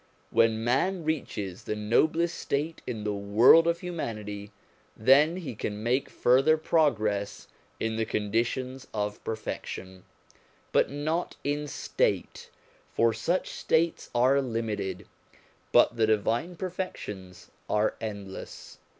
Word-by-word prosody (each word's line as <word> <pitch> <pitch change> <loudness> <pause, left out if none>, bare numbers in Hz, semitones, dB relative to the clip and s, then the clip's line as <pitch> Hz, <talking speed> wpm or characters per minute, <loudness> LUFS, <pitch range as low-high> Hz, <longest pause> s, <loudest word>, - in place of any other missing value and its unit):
When 115 -1 +3
man 165 +10 +1
reaches 105 - -3
the 105 - -2
noblest 155 +11 +2
state 150 +4 -2
in 110 -4 -4
the 105 -1 -1
world 105 +11 +6
of 170 0 +1
humanity, 105 - -5 0.5
then 140 +8 +5
he 175 -9 -5
can 105 0 -4
make 125 +4 +1
further 135 +6 +4
progress 110 -11 0 0.3
in 110 0 -1
the 110 - 0
conditions 120 +5 -2
of 105 0 -3
perfection, 95 -4 -6 0.7
but - - +3
not 155 +5 -2
in 145 +1 -1
state; - - -1 0.4
for 115 -1 +3
such 165 +12 -1
states 165 +1 0
are 130 +3 +4
limited, 115 -6 -3 0.7
but - - +5
the 110 -1 +3
divine 115 - 0
perfections 135 - -6 0.2
are 105 0 +2
endless. 100 -3 -7
115 Hz, 115 wpm, -28 LUFS, 105-155 Hz, 0.7 s, world